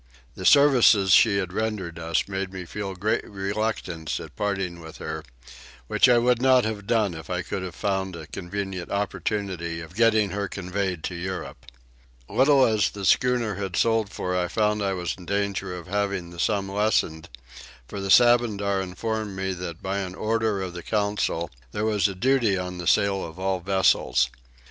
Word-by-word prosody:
The 95 - -2
services 125 -9 +6
she 105 -4 +6
had 95 -2 -2
rendered 100 -6 -3
us 80 -2 0
made 95 -1 -3
me 95 -1 -7
feel 100 +1 -5
great 105 +4 0
reluctance 100 -5 -3
at - - -10
parting 95 -4 -2
with 80 -1 -11
her; 80 0 -5 0.6
which - - +4
I 120 - +6
would 120 0 +2
not 130 -2 +5
have 105 -2 -4
done 110 -5 +2
if 80 0 -9
I 90 -1 -2
could 95 - -4
have 90 -3 -6
found 95 -2 -2
a 80 -1 -8
convenient 95 +1 -5
opportunity 100 -4 -2
of 80 0 -10
getting 110 -1 +3
her 100 0 -2
conveyed 95 -2 -3
to - - -3
Europe. 95 +2 -6 0.6
Little 135 +3 +4
as 110 -4 +2
the 100 -1 -6
schooner 120 -1 +2
had 95 -3 -3
sold 115 -1 +2
for 90 -2 -3
I 90 -1 +1
found 105 +2 0
I 100 -1 0
was 90 -2 -2
in 90 - -12
danger 100 -1 -1
of 85 - -9
having 100 -2 -2
the 85 - -11
sum 100 0 0
lessened; 95 -6 0 0.6
for 100 - -6
the 95 - -4
Sabandar 105 -4 +4
informed 105 +2 -4
me 95 0 -2
that 90 -2 -7
by 95 +1 -1
an 95 -1 -5
order 110 -2 0
of 90 -2 -5
the 90 - -6
council 100 -5 -1 0.2
there 105 - -1
was 105 -2 +2
a 100 - -5
duty 120 -1 +2
on 90 -1 -5
the 85 - -5
sale 95 0 +3
of 80 +1 -8
all 95 0 -1
vessels. 75 -10 +2
95 Hz, 180 wpm, -25 LUFS, 90-105 Hz, 0.6 s, services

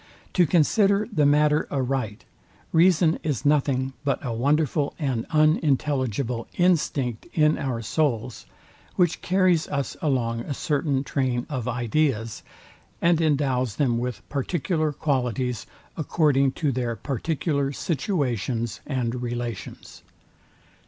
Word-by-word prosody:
To 175 -3 +4
consider 200 +6 +3
the 150 -5 +3
matter 150 +1 +3
aright, 130 -6 -2 0.5
reason 165 -1 +4
is 145 -6 -2
nothing 135 -3 +2
but 140 -2 +1
a 120 - -2
wonderful 145 +4 +1
and 130 -7 -2
unintelligible 140 -6 +1
instinct 145 -9 +1
in 150 -1 +4
our 120 -4 -2
souls, 125 -3 -1 0.5
which 175 -3 +1
carries 185 -3 +2
us 140 -1 -3
along 120 -6 0
a 140 +4 -4
certain 140 -2 0
train 130 -3 -1
of 130 -4 -3
ideas, 120 -2 0 0.6
and 170 -1 +3
endows 135 -7 +1
them 120 -5 +1
with 125 -1 -5
particular 155 +2 -1
qualities, 125 -5 -1 0.3
according 145 -4 +2
to 150 -3 0
their 120 -2 -2
particular 140 +2 -1
situations 130 - -2
and 125 -3 -2
relations. 120 -1 -6
140 Hz, 110 wpm, -25 LUFS, 125-155 Hz, 0.6 s, To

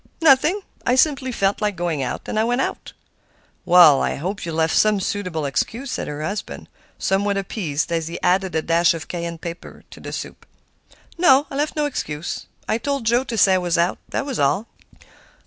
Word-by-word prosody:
"Nothing. 320 +5 +4 0.2
I 250 - +2
simply 265 -2 +2
felt 195 -3 0
like 210 -2 0
going 170 -4 -2
out, 130 - -3
and 215 - -2
I - - +3
went 245 +2 0
out." - - -3 0.7
"Well, 175 -5 +7
I - - 0
hope 185 +4 -4
you - - -3
left 160 0 +1
some 215 -1 +3
suitable 180 -6 -3
excuse," 230 - -2
said - - -3
her 150 +1 -5
husband, 200 +7 -5 0.3
somewhat 200 +1 0
appeased, 170 -6 -2
as 165 -1 -1
he 170 - -6
added 185 -1 +1
a 160 - 0
dash 170 0 +3
of 160 - -7
cayenne 170 -1 -4
pepper 170 +1 -9
to - - -12
the - - -8
soup. - - -7 0.7
"No, 285 -5 +5
I - - -5
left 295 +2 -1
no 300 -1 +1
excuse. 155 - -4 0.2
I 225 - 0
told 275 0 -2
Joe 240 +3 +3
to 235 -4 -5
say 195 -2 +5
I - - +4
was 175 -2 0
out, 170 +2 +1
that - - -2
was 270 -5 -4
all." 145 +10 +2
195 Hz, 200 wpm, -21 LUFS, 165-245 Hz, 0.7 s, Well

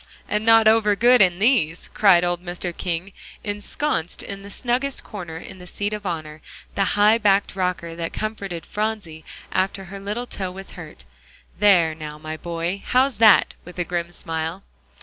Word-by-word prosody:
"And 210 +1 -1
not 225 -1 +6
over 215 -2 +4
good 245 +3 +5
in 180 -3 +4
these," 195 - +2
cried 190 -4 +5
old 175 0 -1
Mr. 175 -1 -4
King, 180 +2 -3 0.3
ensconced 205 - -2
in 195 0 -7
the 200 - -10
snuggest 250 +5 -2
corner 175 -6 -7
in 185 +2 -10
the 180 - -11
seat 205 +3 -3
of 210 -2 -4
honor, 155 -3 -5 0.3
the 200 - +1
high 210 +2 +5
backed 200 -3 +2
rocker 180 -3 -2
that 165 0 -4
comforted 200 -6 -4
Phronsie 210 -7 -4 0.3
after 195 +1 0
her 195 +2 -9
little 210 +5 -4
toe 190 -6 -4
was 195 +1 -9
hurt. - - -11 0.5
"There, 180 -6 +5
now, 155 -1 -8
my 155 +1 -6
boy, 170 +4 -4
how's 255 -2 +2
that?" 215 -2 +6
with 180 - -12
a 175 - 0
grim 175 0 -3
smile. 165 +2 -4
195 Hz, 170 wpm, -23 LUFS, 170-210 Hz, 0.5 s, not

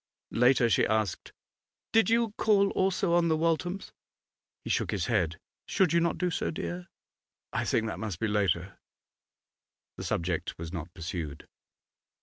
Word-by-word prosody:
Later, 125 0 +4
she 115 - +3
asked 110 -4 -1 0.6
'Did 225 -3 +4
you 230 -1 +3
call 200 -2 +3
also 190 -2 +1
on 170 -1 +4
the 160 -1 +2
Walthams?' 165 +4 -1 0.7
He - - -3
shook - - +1
his - - -1
head. - - +1 0.3
'Should 185 -6 +2
you 170 - +5
not 170 0 +1
do 180 -1 0
so, - - -1
dear? 175 +2 -5 0.7
'I - - 0
think 110 - +1
that 110 - -4
must 105 -6 -4
be 115 - 0
later.' 95 -3 0 1.2
The - - -5
subject 85 -1 -2
was 85 +1 -7
not 85 -1 -5
pursued. 80 -4 -5
130 Hz, 150 wpm, -29 LUFS, -, 1.2 s, you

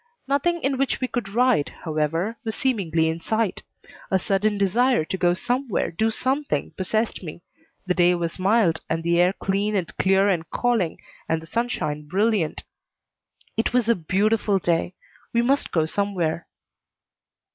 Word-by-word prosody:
Nothing 330 +5 +1
in 270 -1 0
which 275 - 0
we 255 - -1
could 240 -5 -3
ride, 235 - +2
however, 165 +6 -1
was 220 -2 -3
seemingly 175 -11 +1
in 160 +1 -2
sight. 220 +3 -1 0.5
A 190 - +3
sudden 205 +3 0
desire 230 +1 +2
to 190 - -3
go 175 -1 +2
somewhere, 245 +3 -1
do 220 +7 +1
something, 270 +5 -1
possessed 215 +4 -1
me. 170 -1 -9 0.4
The 185 - +1
day 180 0 +4
was 170 +1 -3
mild, 190 -4 +2
and 165 0 -1
the 170 0 +2
air 180 +1 +4
clean 200 +2 -1
and 185 -4 -2
clear 195 +1 +3
and 170 -5 0
calling, 230 -9 0 0.3
and 160 - +1
the 160 - -12
sunshine 160 -8 -2
brilliant. 200 -2 0 0.9
It 225 +2 0
was 245 -3 +2
a 235 - +5
beautiful 205 +3 +1
day. 175 0 0 0.4
We 235 0 +3
must 275 +4 +1
go 160 -2 +2
somewhere. 175 -3 -1
195 Hz, 155 wpm, -24 LUFS, 170-230 Hz, 0.9 s, a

